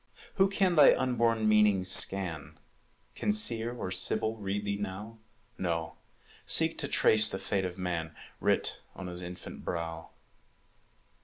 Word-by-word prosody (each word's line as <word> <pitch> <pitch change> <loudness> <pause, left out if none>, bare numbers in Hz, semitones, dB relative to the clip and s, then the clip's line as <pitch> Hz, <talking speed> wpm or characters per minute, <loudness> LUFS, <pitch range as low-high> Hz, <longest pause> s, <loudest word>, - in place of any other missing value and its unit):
Who 195 0 +4
can 190 -2 +1
thy 150 -3 +7
unborn 115 -4 +1
meaning 105 -3 +4
scan? 80 -6 -4 0.6
Can - - -1
Seer 120 - -4
or 120 -6 -5
Sibyl 110 +4 -2
read 105 -1 -3
thee 100 0 -1
now? 105 +3 -6 0.4
No, 85 -3 -2 0.5
seek - - +3
to - - -2
trace 110 0 +6
the 95 - -2
fate 95 0 -2
of 90 0 -5
man 85 -3 -3 0.2
Writ - - 0
on 95 - -7
his 90 0 -7
infant 90 0 -9
brow. 85 -1 -4
100 Hz, 140 wpm, -30 LUFS, 90-115 Hz, 0.6 s, thy